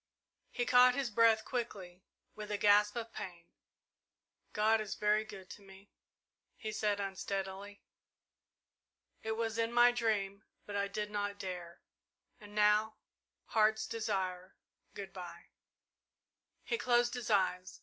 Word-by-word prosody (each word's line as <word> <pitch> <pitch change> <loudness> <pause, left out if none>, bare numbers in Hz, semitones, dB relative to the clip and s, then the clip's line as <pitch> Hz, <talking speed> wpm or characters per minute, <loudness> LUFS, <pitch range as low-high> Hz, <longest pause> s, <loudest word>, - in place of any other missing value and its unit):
He 245 - -2
caught 250 0 +6
his 270 -5 -1
breath 225 0 +4
quickly, 195 -7 -5 0.3
with 210 0 -8
a 205 - -1
gasp 205 +1 +4
of 230 -1 -5
pain. 175 -2 -8 1.1
"God 220 +1 +3
is 215 - -5
very 210 0 +2
good 190 -3 -11
to - - -11
me," 195 0 -16 0.7
he 215 - -5
said 210 -1 0
unsteadily. 195 +1 -5 1.4
"It 220 - -2
was 225 0 -2
in 230 0 +1
my 240 0 +6
dream 215 -4 -1 0.2
but 205 - -7
I 200 0 0
did 210 +1 -4
not 205 -1 -2
dare 180 -3 -7 0.6
and 210 0 -13
now 210 +1 +3 0.5
Heart's 220 0 +2
Desire 190 -4 -3 0.4
good 195 -1 -7
bye!" 175 -2 -9 1.1
He 455 - -2
closed 240 0 +2
his 245 -2 -5
eyes. 185 -3 0
210 Hz, 130 wpm, -34 LUFS, 195-225 Hz, 1.4 s, caught